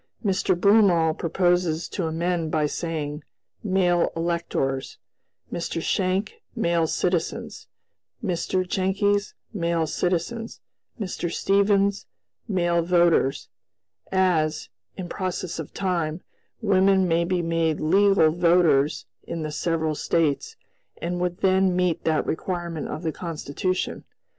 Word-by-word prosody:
"Mr. 185 -2 +1
Broomall 180 -6 +4
proposes 175 -1 +1
to 175 -4 -3
amend 165 0 -1
by 155 -1 +1
saying, 150 -1 -3 0.4
'male 185 -4 +2
electors'; 165 -5 -2 0.6
Mr. 170 -1 -3
Schenck,'male 185 - -1
citizens'; 175 0 -2 0.6
Mr. 185 0 -1
Jenckes, 200 +2 0 0.2
'male 170 -4 0
citizens'; 180 +8 -2 0.4
Mr. 180 -4 -3
Stevens, 200 +1 +2 0.4
'male 175 -4 +1
voters,' 170 -5 +2 0.6
as, 175 -5 +1 0.3
in 185 -2 -5
process 185 -2 -4
of 160 - -6
time, 175 -4 -2 0.4
women 190 -2 +4
may 165 0 +2
be 175 0 0
made 165 -1 0
'legal 190 0 +4
voters' 170 -4 +3 0.2
in 165 -1 -4
the 155 - -4
several 160 0 -1
States, 150 -1 0 0.4
and 175 +1 -3
would 180 0 -2
then 190 -1 +3
meet 180 -2 0
that 155 -2 +1
requirement 170 -2 -3
of 160 - -6
the 160 - 0
Constitution. 170 +2 -3
175 Hz, 110 wpm, -24 LUFS, 165-185 Hz, 0.6 s, Broomall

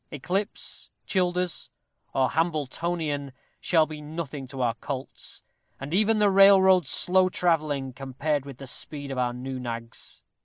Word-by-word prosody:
Eclipse, 185 +8 -3 0.2
Childers, 180 -2 -1 0.4
or 130 -1 +1
Hambletonian, 155 -2 -1 0.3
shall 160 -3 +3
be 155 -1 -8
nothing 150 -3 -6
to 130 +1 -8
our 120 -2 +1
colts, 135 +2 -7 0.4
and 140 +3 -6
even 215 +3 +3
the 205 -1 +4
railroad 190 -2 +6
slow 185 +1 +3
travelling, 150 -7 0
compared 140 +2 -2
with 140 -3 -10
the 135 - -9
speed 140 +2 -1
of 130 - -3
our 125 -1 +1
new 130 +2 -5
nags! 115 -1 -6
150 Hz, 140 wpm, -26 LUFS, 135-180 Hz, 0.4 s, railroad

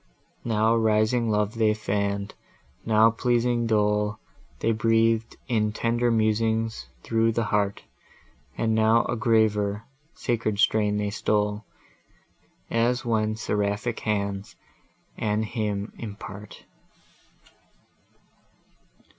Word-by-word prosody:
Now 110 0 +2
rising 110 +1 +2
love 105 0 +1
they 110 -2 +2
fann'd, 100 -1 -2 0.5
now 110 0 +5
pleasing 120 0 +1
dole 105 -1 +1 0.4
They 115 - 0
breath'd 115 0 +1
in 105 -4 0
tender 120 +2 0
musings 110 - 0
through 115 0 +1
the 115 - 0
heart; 105 -1 -1 0.7
And 110 -1 +1
now 110 +1 +3
a - - -2
graver, 110 -3 +1 0.3
sacred 115 -3 -1
strain 105 -1 +2
they 105 -1 -1
stole, 105 0 -1 1.1
As 120 +2 +1
when 110 -2 0
seraphic 105 +2 -2
hands 100 -2 -3 0.6
a 105 -1 0
hymn 105 -2 -3
impart! 105 -2 -9
110 Hz, 95 wpm, -25 LUFS, 105-115 Hz, 1.1 s, now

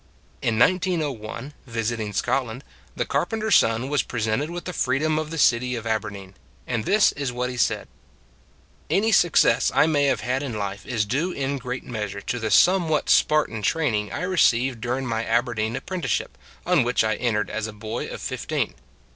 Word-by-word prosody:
In 110 - 0
1901, 145 - 0
visiting 115 -2 -2
Scotland, 125 +4 -1 0.3
the - - -1
carpen 225 - -1
ter 220 +1 -2
s - - +6
son 115 +3 +1
was 145 0 +1
presented 115 +5 -2
with 175 0 -6
the 180 - -4
freedom 155 +4 +1
of 155 -1 -4
the 165 - -5
city 125 -3 +3
of 115 -1 -6
Aberdeen; 105 -4 -3 0.3
and 110 -2 -2
this 210 0 +4
is 140 -3 -3
what 125 +1 -2
he - - -6
said: 120 - 0 1.0
Any 220 +3 +2
success 175 -5 +4
I - - +6
may 145 -3 +2
have 140 - +1
had 130 +2 -1
in 130 -6 -4
life 100 -1 -5
is 115 -5 0
due 145 - -1
in 140 -3 -2
great 125 0 -5
measure 105 -4 -5
to 120 - -3
the 110 -1 -2
somewhat 165 - +3
Spartan 150 -8 +3
training 110 -7 0
I - - -4
received 130 -9 +2
during 125 +3 -2
my 115 -2 -1
Aberdeen 115 -1 0
apprenticeship, 185 +4 -3 0.3
on - - +4
which 120 -1 +1
I 110 0 +1
entered 115 -4 -1
as 110 0 -2
a - - -6
boy 110 +1 -5
of - - -7
fifteen. - - -2
125 Hz, 180 wpm, -24 LUFS, 110-150 Hz, 1.0 s, s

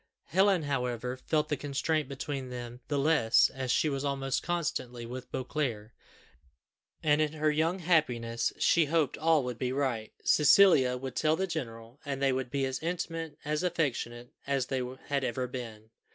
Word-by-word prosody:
Helen, 190 -1 +3
however, 125 -3 -2
felt 150 +3 -1
the 150 - +1
constraint 145 +2 -1
between 135 -1 -4
them 120 0 -7
the 145 - -1
less 140 -6 +4
as 130 -1 -5
she 140 - +3
was 140 -2 -2
almost 135 -1 -1
constantly 130 -8 -3
with 125 +2 -8
Beauclerc, 125 -5 -3 1.1
and 150 0 +3
in 155 0 0
her 155 0 +1
young 160 +4 +1
happiness 125 -10 +1
she 170 -2 +4
hoped 155 -2 +1
all 160 -2 +3
would 125 -2 -5
be 125 -1 -1
right. 130 -5 -1
Cecilia 150 -6 +5
would 130 0 -6
tell 155 0 +2
the 190 - -1
general, 120 -7 -6
and 140 -2 -3
they 135 -1 +2
would 130 -1 -2
be 140 +1 0
as 130 0 -3
intimate, 165 -2 -4
as 150 0 0
affectionate, 130 -9 -2 0.2
as 135 -2 +1
they 130 0 -2 0.3
had 140 -1 0
ever 125 +1 -1
been. 115 -3 -8
135 Hz, 165 wpm, -30 LUFS, 125-155 Hz, 1.1 s, Cecilia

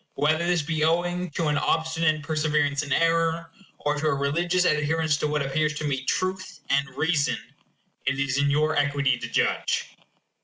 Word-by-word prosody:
Whether 155 +3 +1
this 175 -3 +2
be 155 0 -1
owing 175 +2 0
to 165 - 0
an 150 - +1
obstinate 160 -1 0
perseverance 150 -2 0
in 145 -2 -7
error, 165 +1 +1 0.3
or 150 - -1
to 155 - 0
a 140 - +2
religious 170 +6 +1
adherence 155 0 +1
to 150 - -1
what 150 -1 0
appears 150 +2 0
to 150 - -4
me 135 -3 -1
truth, 185 +5 -2
and 140 0 +2
reason, 160 -2 +1 0.7
it 135 0 +1
is 135 0 0
in 140 0 +2
your 155 +2 +2
equity 145 -3 +1
to - - -5
judge. - - 0
155 Hz, 175 wpm, -25 LUFS, 145-165 Hz, 0.7 s, this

